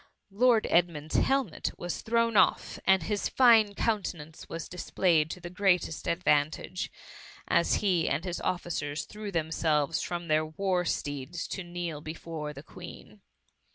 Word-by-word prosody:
Lord 230 Hz, +2 st, +4 dB
Edmund^s 165 Hz, -3 st, +1 dB
helmet 270 Hz, -, 0 dB
was 175 Hz, 0 st, -4 dB
thrown 230 Hz, 0 st, +1 dB
off, -, -, +3 dB
and 190 Hz, -3 st, +5 dB
his 205 Hz, +3 st, -1 dB
fine 225 Hz, -5 st, +5 dB
countenance 175 Hz, -9 st, -3 dB
was 165 Hz, 0 st, -5 dB
displayed 170 Hz, -3 st, +1 dB
to 180 Hz, -, -6 dB
the 175 Hz, 0 st, -8 dB
greatest 180 Hz, -4 st, +1 dB
advantage, 165 Hz, +1 st, 0 dB, 0.6 s
as -, -, +3 dB
he 175 Hz, -5 st, +2 dB
and 155 Hz, +6 st, -1 dB
his 180 Hz, -1 st, -3 dB
officers, 155 Hz, -4 st, -2 dB
threw 210 Hz, -1 st, -7 dB
themselves 160 Hz, -2 st, 0 dB
from 175 Hz, -1 st, -4 dB
their 155 Hz, 0 st, +3 dB
war 180 Hz, +2 st, -1 dB
steeds 145 Hz, +2 st, -3 dB
to 190 Hz, -, -4 dB
kneel 175 Hz, -3 st, -5 dB
before 155 Hz, -1 st, -6 dB
the 140 Hz, 0 st, -10 dB
Queen. 180 Hz, +4 st, -12 dB
175 Hz, 140 wpm, -29 LUFS, 155-195 Hz, 0.6 s, and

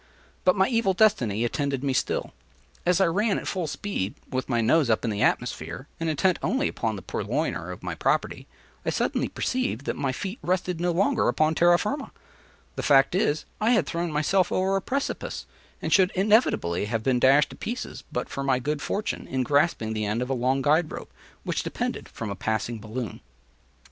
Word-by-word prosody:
But 185 Hz, -, +5 dB
my 190 Hz, -1 st, +3 dB
evil 230 Hz, -6 st, +2 dB
destiny 120 Hz, -, +3 dB
attended 140 Hz, +2 st, -1 dB
me 135 Hz, -2 st, +1 dB
still. -, -, -1 dB, 0.5 s
As 180 Hz, 0 st, +4 dB
I 190 Hz, -, +5 dB
ran 200 Hz, +5 st, +1 dB
at -, -, -5 dB
full 180 Hz, -4 st, -2 dB
speed, 145 Hz, -, -3 dB, 0.2 s
with 130 Hz, 0 st, -2 dB
my 120 Hz, -2 st, +2 dB
nose 130 Hz, +4 st, +3 dB
up 110 Hz, +2 st, +2 dB
in 115 Hz, -, 0 dB
the 105 Hz, 0 st, -2 dB
atmosphere, 85 Hz, -, -1 dB
and 165 Hz, 0 st, -1 dB
intent 175 Hz, +4 st, +2 dB
only 265 Hz, +3 st, +1 dB
upon -, -, -2 dB
the -, -, -8 dB
purloiner -, -, -2 dB
of -, -, -9 dB
my -, -, -3 dB
property, -, -, -1 dB, 0.4 s
I -, -, -1 dB
suddenly -, -, 0 dB
perceived 250 Hz, -, -2 dB
that -, -, -1 dB
my 135 Hz, -2 st, -1 dB
feet 190 Hz, -, -5 dB
rested 180 Hz, -1 st, -1 dB
no 175 Hz, -, +1 dB
longer 205 Hz, +8 st, +2 dB
upon 155 Hz, 0 st, +2 dB
terra 175 Hz, +2 st, +5 dB
firma; 275 Hz, +9 st, -3 dB, 0.7 s
the -, -, -3 dB
fact 135 Hz, +1 st, +5 dB
is, 155 Hz, -5 st, +1 dB, 0.2 s
I 225 Hz, +3 st, +4 dB
had 210 Hz, -, +3 dB
thrown 170 Hz, +2 st, -2 dB
myself 165 Hz, +5 st, +2 dB
over 190 Hz, +1 st, +1 dB
a 195 Hz, -, +1 dB
precipice, 275 Hz, +7 st, -3 dB, 0.4 s
and -, -, 0 dB
should 190 Hz, -1 st, +5 dB
inevitably 190 Hz, -, +2 dB
have 110 Hz, +1 st, -2 dB
been 125 Hz, 0 st, +2 dB
dashed 135 Hz, +4 st, +5 dB
to -, -, -9 dB
pieces 240 Hz, +3 st, -5 dB
but 125 Hz, -, -2 dB
for 140 Hz, -, -5 dB
my 135 Hz, -2 st, +2 dB
good 145 Hz, +3 st, -2 dB
fortune 210 Hz, +9 st, -3 dB
in 130 Hz, 0 st, -1 dB
grasping 140 Hz, -5 st, +1 dB
the 110 Hz, -1 st, -1 dB
end 110 Hz, +4 st, 0 dB
of 125 Hz, -, -4 dB
a -, -, +3 dB
long 130 Hz, +2 st, +1 dB
guide 155 Hz, +2 st, +3 dB
rope, -, -, -8 dB, 0.3 s
which -, -, -1 dB
depended -, -, -4 dB
from 110 Hz, -3 st, -5 dB
a -, -, -3 dB
passing 110 Hz, +3 st, -2 dB
balloon. 110 Hz, +2 st, -5 dB
150 Hz, 200 wpm, -26 LUFS, 125-190 Hz, 0.7 s, But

